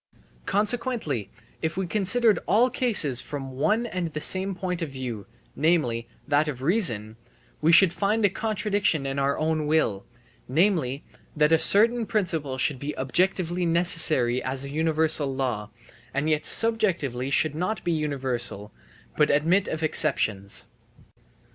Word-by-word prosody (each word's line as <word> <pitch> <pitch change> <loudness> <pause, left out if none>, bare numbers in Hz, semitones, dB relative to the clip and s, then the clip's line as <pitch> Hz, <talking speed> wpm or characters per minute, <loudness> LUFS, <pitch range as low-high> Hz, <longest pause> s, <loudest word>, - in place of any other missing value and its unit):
Consequently 210 - -1 0.3
if 160 +2 -3
we 190 - -1
considered 215 +4 +1
all 235 +6 +3
cases 160 - +5
from 135 -2 -7
one 210 - 0
and 185 -6 -4
the 150 - -4
same 190 +4 +1
point 180 -1 -4
of 165 - -3
view, 125 -6 -7 0.3
namely, 140 -8 0 0.2
that 145 +2 +1
of 130 -3 -6
reason, 120 - +2 0.4
we 160 +2 +3
should 175 +1 +6
find 210 +3 0
a - - +4
contradiction 205 -8 -1
in 135 0 -3
our 140 0 0
own 155 -1 -1
will, 130 -11 0 0.4
namely, 155 -3 0 0.3
that 150 0 +3
a 160 - +4
certain 230 +5 +3
principle 160 -10 -2
should 130 0 -1
be 145 +2 -6
objectively 175 +5 -1
necessary 165 -7 +2
as 130 +1 -4
a 140 - -7
universal 155 -2 +1
law, 125 -6 -3 0.5
and 140 +2 -1
yet 155 -1 0
subjectively 170 - +1
should 150 +2 +1
not 180 +8 -3
be 175 - -1
universal, 130 -9 -2 0.4
but 150 - +2
admit 165 +7 +2
of 160 0 -4
exceptions. 110 -11 +2
155 Hz, 140 wpm, -25 LUFS, 135-190 Hz, 0.5 s, should